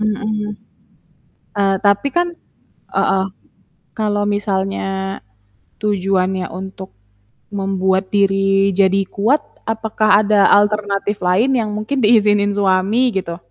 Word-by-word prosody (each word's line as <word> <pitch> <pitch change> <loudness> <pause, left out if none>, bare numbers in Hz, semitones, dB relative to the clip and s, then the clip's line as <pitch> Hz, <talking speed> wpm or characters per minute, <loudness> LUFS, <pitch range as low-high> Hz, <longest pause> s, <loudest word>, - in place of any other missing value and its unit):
Mhm. 215 0 -2 1.1
Eee, 195 -1 +2
tapi 200 +7 +2
kan 345 +4 0 0.6
heeh, 190 0 +2 0.7
kalau 205 -1 0
misalnya 195 -1 -2 0.6
tujuannya 190 -2 0
untuk 190 0 -8 0.6
membuat 190 -1 0
diri 195 0 +2
jadi 195 0 +3
kuat 230 +9 +1 0.3
apakah 220 -1 +2
ada 205 -1 +4
alternatif 205 0 +1
lain 220 +9 +2
yang 220 -3 -1
mungkin 220 +6 -2
diizinin 205 -2 +4
suami 200 +5 +2
gitu? 170 -2 -4
200 Hz, 100 wpm, -18 LUFS, 195-215 Hz, 1.1 s, ada